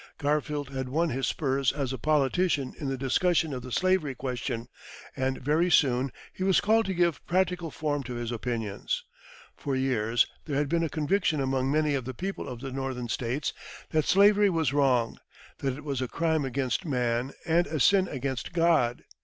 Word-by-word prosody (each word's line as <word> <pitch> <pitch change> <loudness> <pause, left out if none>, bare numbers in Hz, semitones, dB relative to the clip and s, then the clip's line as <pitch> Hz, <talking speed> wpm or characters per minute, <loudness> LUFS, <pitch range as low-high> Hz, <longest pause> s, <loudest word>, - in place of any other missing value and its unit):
Garfield 145 -1 -1
had 130 -1 -4
won 165 +5 +1
his 135 -1 -1
spurs 135 -3 +1
as 135 -2 -3
a - - -3
politician 150 +1 +1
in 145 - -3
the 135 - -2
discussion 160 +4 +1
of 125 - -4
the 125 +1 -9
slavery 185 -4 +1
question, 125 -2 -4 0.5
and 130 0 -1
very 155 +6 +1
soon 130 -5 +3 0.2
he 185 - -4
was 190 -1 +4
called 225 +1 +3
to 190 - -1
give 170 -5 +1
practical 180 -2 +1
form 150 -2 -2
to 125 -1 -6
his 120 0 -3
opinions. 115 -3 -3 0.5
For 140 -2 -3
years 120 -4 +2 0.2
there 145 - -3
had 145 -1 0
been 170 +1 +1
a 165 - -1
conviction 160 +1 +1
among 135 0 0
many 155 0 +2
of 135 -3 -1
the 130 0 -5
people 195 +6 -4
of 125 -2 -7
the 135 -1 -5
Northern 130 -2 -4
States 125 +6 -2 0.4
that 155 -2 +2
slavery 205 +1 +5
was 160 -5 0
wrong, 130 -5 +2 0.4
that 135 -1 -2
it 145 - -10
was 140 -3 -2
a 130 - -1
crime 160 0 0
against 130 +4 -1
man 125 -4 -1
and 170 +1 +2
a 155 - -3
sin 190 +7 +4
against 135 +2 -4
God. 165 -8 +2
140 Hz, 185 wpm, -28 LUFS, 130-165 Hz, 0.5 s, slavery